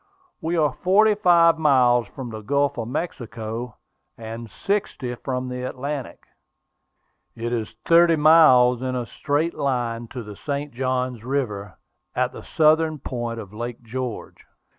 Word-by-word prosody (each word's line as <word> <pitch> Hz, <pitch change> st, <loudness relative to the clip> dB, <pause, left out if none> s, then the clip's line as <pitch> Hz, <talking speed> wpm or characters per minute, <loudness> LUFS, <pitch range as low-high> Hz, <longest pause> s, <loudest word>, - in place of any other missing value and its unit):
We 170 Hz, +2 st, -1 dB
are 150 Hz, -3 st, +3 dB
forty 210 Hz, +7 st, +4 dB
five 170 Hz, -5 st, +4 dB
miles 125 Hz, -6 st, +4 dB
from 125 Hz, +2 st, -8 dB
the 110 Hz, -1 st, -7 dB
Gulf 140 Hz, +4 st, +1 dB
of 115 Hz, -, -3 dB
Mexico, 120 Hz, -, -5 dB, 0.4 s
and 115 Hz, 0 st, -7 dB
sixty 160 Hz, -, -2 dB
from 125 Hz, +1 st, -4 dB
the 125 Hz, 0 st, -5 dB
Atlantic. 135 Hz, +2 st, -5 dB, 1.1 s
It 120 Hz, +1 st, -3 dB
is 110 Hz, -3 st, -3 dB
thirty 170 Hz, 0 st, +6 dB
miles 150 Hz, -6 st, +6 dB
in 130 Hz, -1 st, -2 dB
a 125 Hz, -1 st, -2 dB
straight 150 Hz, +7 st, -1 dB
line 120 Hz, -4 st, -2 dB
to 125 Hz, +1 st, -7 dB
the 105 Hz, -1 st, -9 dB
St. 145 Hz, +4 st, -4 dB
Johns 125 Hz, -2 st, -2 dB
River, 120 Hz, -7 st, -3 dB, 0.4 s
at -, -, +1 dB
the -, -, -9 dB
southern 155 Hz, 0 st, +2 dB
point 120 Hz, -4 st, -4 dB
of 105 Hz, -2 st, -10 dB
Lake 120 Hz, +2 st, -6 dB
George." 125 Hz, 0 st, -6 dB
125 Hz, 140 wpm, -23 LUFS, 120-150 Hz, 1.1 s, thirty